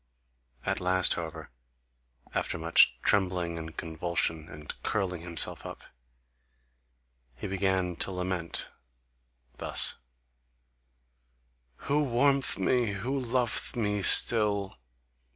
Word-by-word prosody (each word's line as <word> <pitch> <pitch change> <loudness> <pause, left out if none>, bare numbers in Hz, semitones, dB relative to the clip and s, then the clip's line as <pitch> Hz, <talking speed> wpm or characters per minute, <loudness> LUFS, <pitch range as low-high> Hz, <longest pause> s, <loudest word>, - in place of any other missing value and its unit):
At - - -1
last, 90 0 +2
however, 80 -4 -7 0.8
after - - -2
much 80 +1 +4
trembling, 90 -4 0
and 80 -1 -9
convulsion, 80 -1 -2
and 75 0 -8
curling 90 -5 -2
himself 85 -2 0
up, - - -9 1.5
he - - -8
began 95 -2 -1
to - - -3
lament 90 -2 -4 0.9
thus: - - 0 1.9
Who 150 +1 +1
warm'th 140 +1 +1
me, 115 +2 0
who 125 +8 -3
lov'th 125 0 -1
me 105 -3 -1
still? 100 - +5
95 Hz, 95 wpm, -28 LUFS, 85-110 Hz, 1.9 s, still